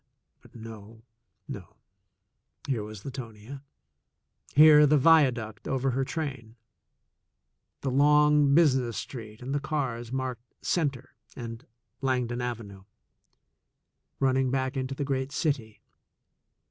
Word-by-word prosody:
But - - -20
no, 110 -1 -11 0.4
no; 90 -4 -9 0.9
here 125 -5 0
was 105 -1 -9
Latonia 130 -1 -8 0.5
— - - -32
here 150 0 +8
the 150 +1 +4
viaduct 130 -8 +3
over 135 0 0
her 135 +2 0
train, 130 -7 -5 1.3
the 135 - -1
long 150 +1 +4
business 130 -8 +3
street 110 -2 -8
and 135 +2 -4
the 145 - +1
cars 130 -6 -3
marked 130 -3 -3 0.2
''Center" 140 -6 -1 0.3
and 115 +2 -8 0.3
"Langdon 125 -2 -1
Avenue" 105 -6 -6 1.3
running 130 -1 +2
back 130 +1 -1
into 130 0 -3
the 145 - -3
great 135 0 -2
city. 140 -8 -2
130 Hz, 110 wpm, -28 LUFS, 115-140 Hz, 1.3 s, here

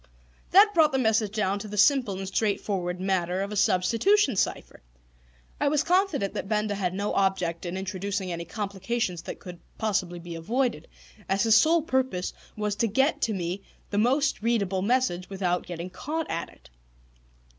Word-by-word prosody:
That 405 +3 +7
brought 315 -4 +5
the - - +2
message 220 -4 +2
down 200 -2 0
to 215 - -7
the 210 0 -7
simple 220 -3 +3
and 195 0 -5
straightforward 190 -3 -1
matter 185 -1 0
of 200 - -5
a - - -4
substitution 230 - +3
cipher. - - -2 0.8
I - - +1
was 295 +1 +2
confident 345 - +1
that 195 - -5
Benda 210 -1 0
had 185 -2 -2
no 205 +2 -2
object 190 -3 0
in 175 +2 -4
introducing 190 0 -3
any 170 0 -4
complications 200 -2 -3
that - - -7
could 175 -2 -10 0.2
possibly 185 -5 -1
be 170 0 -8
avoided, 225 - -1 0.4
as 195 +1 +2
his 225 -1 +5
sole 320 +6 +5
purpose 260 - -1 0.2
was 210 -1 -1
to 230 - +2
get 265 +8 +1
to 220 - +1
me 180 +1 -3 0.3
the 205 - +1
most 265 +3 +2
readable 200 -5 0
message 205 -5 0
without 180 -2 -1
getting 175 +1 -6
caught 315 - -4
at 165 - -3
it. - - -20
200 Hz, 170 wpm, -27 LUFS, 185-240 Hz, 0.8 s, That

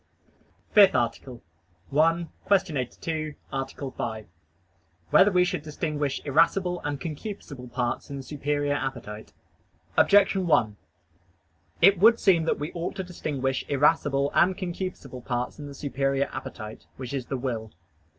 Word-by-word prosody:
_______________________ - - -30
FIFTH 205 -3 +7
ARTICLE 120 +1 -2 0.5
[I, 165 +3 +3 0.2
Q. 190 -5 +3
82, 155 +4 -3 0.2
Art. 135 0 -2
5] 115 -5 -5 0.9
Whether 200 +2 +6
We 180 -1 +4
Should 175 - -2
Distinguish 150 -2 -2
Irascible 175 +5 +2
and 145 -1 -3
Concupiscible 150 - -7
Parts 120 -1 -2
in 140 - -5
the 135 - -6
Superior 145 +1 -1
Appetite? 120 -6 -5 0.6
Objection 195 -2 +4
1: 115 -10 +3 1.1
It 195 0 +7
would 230 +4 +6
seem 170 -5 +4
that - - +1
we 150 +3 -5
ought 170 0 -4
to 190 - -3
distinguish 140 -7 -2
irascible 140 -1 +2
and 180 +1 +3
concupiscible 175 -9 -5
parts 125 +3 -3
in 145 - -7
the 140 - -9
superior 135 0 0
appetite, 110 -4 -8
which 130 0 -6
is 130 -3 -3
the 135 - -2
will. 115 -4 -4
145 Hz, 140 wpm, -26 LUFS, 130-170 Hz, 1.1 s, FIFTH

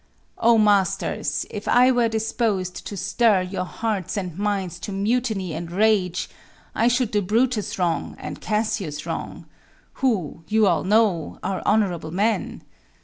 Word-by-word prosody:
Oh, 230 0 +5
masters! 205 -3 +1
if 210 - -6
I 250 +1 +5
were 240 -2 +2
dispos'd 220 -4 -2
to 200 - -6
stir 215 0 +2
Your 185 0 -3
hearts 210 -1 -3
and 180 -5 -4
minds 195 -3 -2
to 200 - -6
mutiny 205 -3 -1
and 165 +2 -5
rage, 190 -2 +2 0.5
I 230 - +2
should 245 -1 +1
do 210 -2 +1
Brutus 225 +3 0
wrong, 175 -3 -1
and - - -7
Cassius 210 -8 -2
wrong, - - -5 0.6
Who, 185 - 0
you 220 +3 +3
all 175 -5 +2
know, 200 -5 +2
are 190 0 -2
honorable 190 -7 +1
men. 205 +7 -1
205 Hz, 145 wpm, -23 LUFS, 180-225 Hz, 0.6 s, Oh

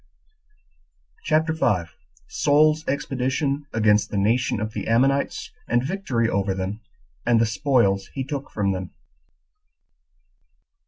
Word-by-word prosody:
CHAPTER 160 +1 +2
5. 90 - 0 0.3
Saul's 155 +1 +3
Expedition 140 +1 -1
Against 105 -1 +2
The 100 - -3
Nation 115 +4 +1
Of 110 0 -4
The 100 - -4
Ammonites 135 +5 +1 0.2
And 120 +1 +1
Victory 140 - -1
Over 100 -2 0
Them 95 +3 -4 0.4
And 120 -1 +3
The 115 - +4
Spoils 115 -5 +1
He 135 - -2
Took 140 +1 -5
From 100 -2 -1
Them. 95 -1 -5
120 Hz, 115 wpm, -23 LUFS, 105-140 Hz, 0.4 s, The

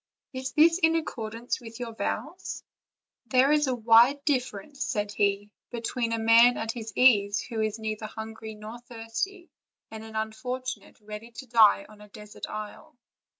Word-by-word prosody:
Is 260 0 -5
this 330 +3 +5
in 325 -2 +3
accordance 235 -6 -3
with 225 0 -10
your 235 -2 -5
vows?" - - -4 0.6
"There 255 +4 +4
is 300 -1 +3
a 255 - 0
wide 240 +5 +5
difference," 260 -1 -2
said 205 -3 -2
he, 205 0 0 0.2
"between 235 0 -3
a 230 - 0
man 230 +2 +6
at 225 0 -2
his 225 -2 -7
ease, 205 -5 +5
who 225 -3 -4
is 215 0 -1
neither 215 0 -4
hungry 220 0 -8
nor 215 +3 -9
thirsty, 240 +11 -5 0.4
and 220 0 -8
an 220 0 -11
unfortunate 250 +5 -5
ready 210 +2 -9
to 265 - -9
die 220 -4 +5
in 210 -1 -16
a 210 - -13
desert 210 0 -9
isle." 215 +2 -8
225 Hz, 160 wpm, -27 LUFS, 215-255 Hz, 0.6 s, man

